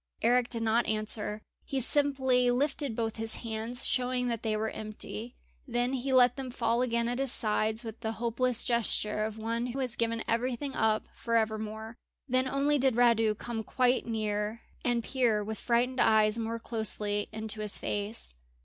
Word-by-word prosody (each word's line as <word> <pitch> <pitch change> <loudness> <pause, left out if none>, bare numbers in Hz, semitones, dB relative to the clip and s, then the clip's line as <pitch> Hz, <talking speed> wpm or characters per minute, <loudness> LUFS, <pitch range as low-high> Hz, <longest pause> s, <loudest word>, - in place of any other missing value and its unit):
Eric 245 +1 +3
did 230 -1 -1
not 225 +1 +2
answer; 215 0 -1 0.2
he 270 - -2
simply 260 -2 +3
lifted 275 0 +1
both 225 -1 -2
his 225 0 +3
hands, 225 +2 -1
showing 250 -1 0
that 230 -2 -2
they 215 -1 0
were 220 +1 -1
empty; 215 +2 -6 0.3
then 245 +1 0
he 265 +1 -2
let 250 -1 +5
them 265 -1 -5
fall 240 -1 0
again 235 -2 0
at 245 +2 -2
his 270 -2 +3
sides 220 +1 +1
with 225 -1 -7
the 220 -1 -3
hopeless 240 +1 +1
gesture 215 -3 +1
of 220 0 -4
one 230 +2 -2
who 250 +2 -5
has 250 -3 -2
given 230 -1 -1
everything 255 +4 -1
up 220 -1 +1
for 230 -1 -2
ever 220 -1 +2
more. 220 +1 -6 0.3
Then 255 0 +1
only 280 +2 +1
did 260 -2 +2
Radu 225 -3 +4
come 230 -2 -4
quite 250 +2 +1
near 215 0 -2 0.2
and 240 -2 +1
peer 235 -6 +1
with 215 +1 -5
frightened 245 +2 +1
eyes 215 0 +4
more 225 0 -2
closely 210 -2 -2
into 220 0 -3
his 210 -1 -1
face. 205 - -3
230 Hz, 175 wpm, -30 LUFS, 220-250 Hz, 0.3 s, let